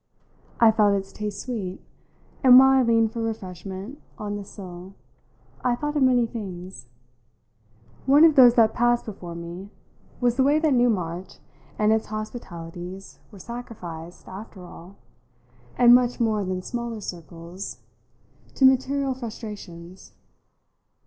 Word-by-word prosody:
I 230 -1 +7
felt 210 -2 +3
its 195 0 -4
taste 210 -1 -5
sweet, 205 -7 -5 0.6
and 255 -1 +9
while 265 +1 +8
I 265 0 +5
leaned 230 -2 +2
for 230 - -4
refreshment 195 - -6 0.2
on 205 -1 -4
the 205 - -5
sill 185 -1 -11 0.7
I 245 -1 +2
thought 295 +4 -4
of 295 - +1
many 250 -2 +4
things. 190 - -8 1.2
One 285 +3 +6
of 320 - +6
those 245 -3 +7
that 225 -2 +4
passed 240 0 +1
before 180 -5 -8
me 170 +3 -8 0.5
was 245 -1 +1
the 265 - +4
way 285 +3 +4
that 310 -2 +2
Newmarch 190 -7 0 0.4
and 215 0 +3
its 220 - -1
hospitalities 190 -4 -8
were 205 - -13
sacrificed, 180 -7 -9
after 190 -1 -10
all, 180 +2 -13 0.8
and 240 -1 +7
much 245 0 +3
more 220 -3 +1
than 185 -1 -3
smaller 235 0 -5
circles, 175 0 -8 0.8
to 270 - +4
material 265 +1 +2
frustrations. 200 - -9
215 Hz, 135 wpm, -24 LUFS, 185-245 Hz, 1.2 s, and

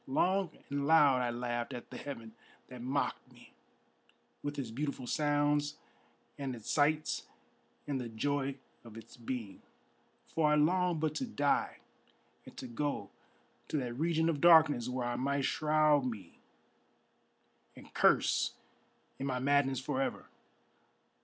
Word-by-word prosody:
Long 185 +7 +2 0.2
and 140 0 -1
loud 145 -5 +6
I 125 - 0
laughed 120 +1 -3
at 120 -2 -8
the - - -7
heaven 115 -6 -7 0.4
that 125 -2 -9
mocked 130 +3 -2
me - - -18 0.9
With 145 0 -4
its 130 -5 -4
beautiful 140 +1 -3
sounds 145 0 +1 0.6
and 135 -3 -3
its 115 - -9
sights 155 +1 +1 0.6
and 140 -3 -1
the 120 - -5
joy 140 +4 -1 0.3
of 115 -2 -12
its 115 - -12
being, 115 -4 -6 0.7
For 155 -2 +1
I - - +5
longed 175 +2 +2
but 155 -1 0
to - - -2
die 145 -11 0 0.7
and - - -13
to - - -6
go 120 -4 -3 0.6
to - - -1
that 125 -4 -2
region 160 +4 +1
of 155 -4 0
darkness 155 -8 +6
Where 125 -1 -2
I 120 - -2
might 140 +1 0
shroud 150 -2 +3
me 105 -8 -7 1.4
and - - -14
curse - - +3 0.7
in 135 - -2
my 130 -2 -1
madness 135 -1 +2
for 135 0 -2
ever. 135 - -2
140 Hz, 140 wpm, -33 LUFS, 125-150 Hz, 1.4 s, loud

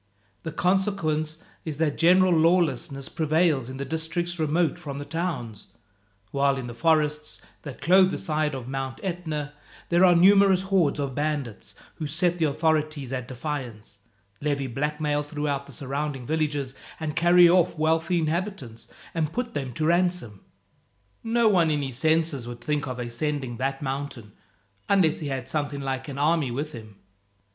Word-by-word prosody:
The 160 - -5
consequence 165 -4 0 0.3
is 155 -3 -5
that 155 -2 +1
general 180 +2 +5
lawlessness 155 -5 +2
prevails 155 -5 +1
in 130 - -7
the 140 - -4
districts 165 +2 -2
remote 160 +2 +1
from 145 -5 -6
the 145 - -6
towns; 145 - -4 0.6
while 140 0 +2
in 130 - -4
the 120 - -6
forests 150 +1 +1 0.2
that 140 -4 -9
clothe 185 +6 +5
the - - -3
side 155 -2 -1
of 125 -2 -7
Mount 135 0 -4
Etna, 160 -6 -3 0.4
there 175 +1 +4
are 180 -2 +7
numerous 190 +1 +6
hordes 190 -7 +2
of 140 -2 -2
bandits 145 -6 -3 0.2
who 155 - -3
set 175 +3 +1
the 160 - +3
authorities 155 -2 0
at 125 -2 -3
defiance, 125 -6 -6 0.4
levy 140 -2 -1
blackmail 150 +3 -1
throughout 145 -1 -3
the - - -11
surrounding 135 0 -4
villages, 150 -3 -1 0.3
and 155 -1 -3
carry 175 +1 +6
off 175 -1 +3
wealthy 160 +3 +1
inhabitants, 160 - -3 0.3
and 160 -2 -1
put 245 +2 -3
them 135 -3 -3
to 155 - -2
ransom. 170 - 0 0.8
No 230 0 +2
one 175 -6 +4
in 150 -2 0
his 130 -3 -4
senses 155 -4 +1
would 120 0 -8
think 150 +2 -1
of 130 -1 -4
ascending 125 +1 -3
that 135 +2 -2
mountain, 135 -5 -5 0.6
unless 185 -6 +3
he 155 - -4
had 135 -2 -3
something 145 -2 -2
like 135 0 -3
an 140 -2 -6
army 150 -1 +2
with 145 +6 -3
him." 110 -6 -10
150 Hz, 160 wpm, -25 LUFS, 135-170 Hz, 0.8 s, are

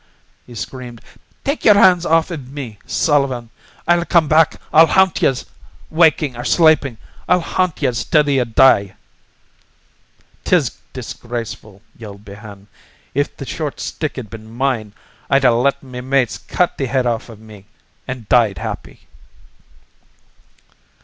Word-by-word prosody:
he 120 - -12
screamed. 120 +1 -7 0.4
"Take 280 +3 -2
yer 210 - +7
hands 185 -3 +5
off 165 +2 +2
iv 135 -6 -7
me, 125 -8 -8
Sullivan! 135 -6 0 0.4
I'll 175 0 +3
come 170 -3 +3
back! 160 +1 +3
I'll 160 +1 +7
haunt 190 +1 +2
yez! 130 - +1 0.5
Wakin' 155 -4 +3
or 120 - -6
slapin', 155 -5 +3 0.3
I'll 180 0 +4
haunt 175 -2 -2
yez 125 -4 0
till 150 -1 +2
you 135 -3 +2
die!" 110 -4 +4 1.5
"'Tis - - +1
disgraceful!" 115 -4 -7
yelled 105 -2 -11
Behane. 100 -1 -12 0.5
"If 145 +2 -2
the 135 - -7
short 150 +1 -5
stick'd 130 -8 -5
ben 110 -1 -10
mine, 120 -4 -2 0.4
I'd 135 -1 +3
a 125 - +6
let 140 +4 +1
me 125 -2 -8
mates 130 -2 0
cut 180 - -1
the 135 - -1
head 130 0 0
off 120 -1 -2
iv 115 - -11
me 105 -3 -15 0.4
an' 125 -3 -6
died 115 -6 +3
happy." - - -7
130 Hz, 135 wpm, -18 LUFS, 115-155 Hz, 1.5 s, yer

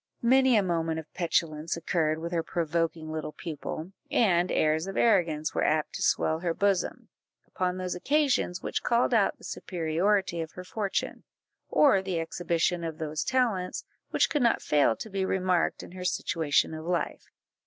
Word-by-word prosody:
Many 260 +1 +5
a 205 - +3
moment 165 -3 -1
of 160 -1 -8
petulance 165 -2 -1
occurred 160 -2 0
with 170 +1 -5
her 170 -2 +1
provoking 165 -1 -2
little 155 -1 -4
pupil, 160 +1 -6 0.2
and 180 -5 +3
airs 155 +3 +1
of 195 - -5
arrogance 165 -9 +2
were - - 0
apt 155 0 +1
to - - -5
swell 160 0 +2
her 170 -1 -1
bosom, 200 -2 0 0.4
upon 180 0 -2
those 185 -1 -3
occasions 260 -4 +1
which - - -2
called 240 +1 +2
out 215 -4 +3
the - - -20
superiority 175 +2 -1
of 160 - -6
her 180 - -8
fortune, 195 +2 -3 0.5
or 270 -10 +5
the 190 -3 -2
exhibition 170 +1 -1
of 160 -2 -4
those 155 -1 -3
talents 230 -8 0 0.2
which - - +3
could 295 - 0
not 235 -1 +3
fail 145 -6 +3
to - - -7
be 195 0 -1
remarked 185 -2 0
in - - -11
her 180 0 -7
situation 160 -4 +1
of 155 0 -6
life. 175 +1 -2
175 Hz, 170 wpm, -28 LUFS, 160-190 Hz, 0.5 s, Many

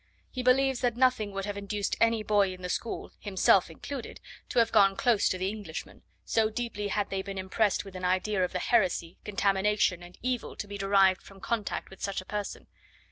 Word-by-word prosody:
He 255 - -3
believes 260 +1 +3
that 240 -2 0
nothing 250 -5 +2
would 195 0 -4
have 205 -1 -4
induced 200 0 -2
any 230 -1 +3
boy 200 -3 +2
in 185 - -14
the 180 - -3
school, 230 - -3
himself 190 -2 +3
included, 250 - -7 0.3
to - - -4
have 230 -1 +4
gone 195 -3 +5
close 230 -2 +3
to 185 - -1
the 185 +1 -1
Englishman; 200 -6 -7 0.2
so 220 -1 +2
deeply 220 -3 -3
had 205 0 -1
they 195 -1 -1
been 195 0 -7
impressed 195 +2 0
with 195 -1 -11
an 185 - -6
idea 185 +2 +1
of 180 - -1
the 185 - -2
heresy, 180 -5 +1
contamination, 200 -2 +1
and 175 +1 -13
evil 250 -1 -2
to 205 - -6
be 200 0 -7
derived 195 -1 +4
from 195 -1 -15
contact 220 -1 -3
with 190 - -13
such 200 -1 -2
a 185 - -9
person. 205 0 -5
200 Hz, 205 wpm, -29 LUFS, 190-225 Hz, 0.3 s, gone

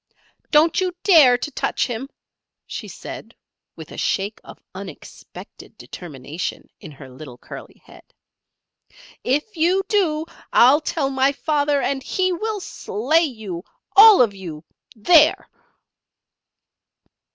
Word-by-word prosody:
"Don't 315 +4 +3
you 365 -1 -1
dare 300 -11 +6
to 300 - -6
touch - - -1
him," 250 +2 -6 0.6
she - - -7
said, - - -10 0.4
with - - -11
a - - -8
shake 200 +2 -2
of - - -13
unexpected 185 -4 -12
determination 155 0 -7
in 180 - -11
her 140 -2 -13
little 130 -1 -12
curly - - -12
head; - - -17 1.2
"if 295 - -1
you 355 +4 +1
do, 320 -7 0 0.3
I'll 270 +6 +5
tell 300 -3 -2
my 265 +1 +2
father, 290 -1 0
and 275 -1 -1
he 370 +6 -1
will 430 +4 -3
slay 310 - 0
you! 215 - -7 0.3
All 420 - +9
of 215 -4 -1
you 170 -6 -9 0.3
there!" 305 +8 +4
275 Hz, 120 wpm, -21 LUFS, 195-325 Hz, 1.2 s, All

